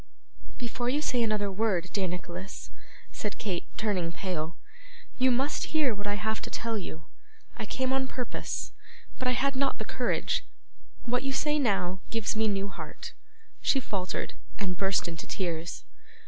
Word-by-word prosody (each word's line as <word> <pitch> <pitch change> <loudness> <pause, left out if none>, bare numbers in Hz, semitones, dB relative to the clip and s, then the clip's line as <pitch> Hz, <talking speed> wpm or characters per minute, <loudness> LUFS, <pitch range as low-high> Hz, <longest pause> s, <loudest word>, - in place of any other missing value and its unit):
'Before 240 0 -1
you 285 +4 +3
say 255 -5 +2
another 210 -3 +2
word, 190 -3 +2
dear 195 -2 +2
Nicholas,' 180 +1 -5 0.4
said 210 -2 -3
Kate, 185 -5 -1
turning 190 -6 +1
pale, 170 -3 -2 0.6
'you 260 +1 +7
must 270 +5 +2
hear 280 -6 +5
what 205 0 -4
I 205 - +2
have 220 +1 0
to - - -4
tell 230 -2 0
you. 160 -4 -6 0.5
I - - -4
came 260 0 +1
on 265 0 +2
purpose, 250 -2 -2 0.5
but 255 - +1
I 250 - +5
had 275 +2 +2
not 275 +1 +2
the - - -3
courage. - - +1 0.6
What 245 +1 +2
you 270 0 0
say 300 +2 +3
now, 195 -7 +2
gives 225 -2 +1
me 220 0 +3
new 200 -1 +1
heart.' 195 - -6 0.5
She 270 - +5
faltered, 195 -7 -1 0.2
and 190 -3 0
burst 195 -1 +3
into 165 -1 -5
tears. 170 -3 -1
210 Hz, 160 wpm, -30 LUFS, 185-250 Hz, 0.6 s, you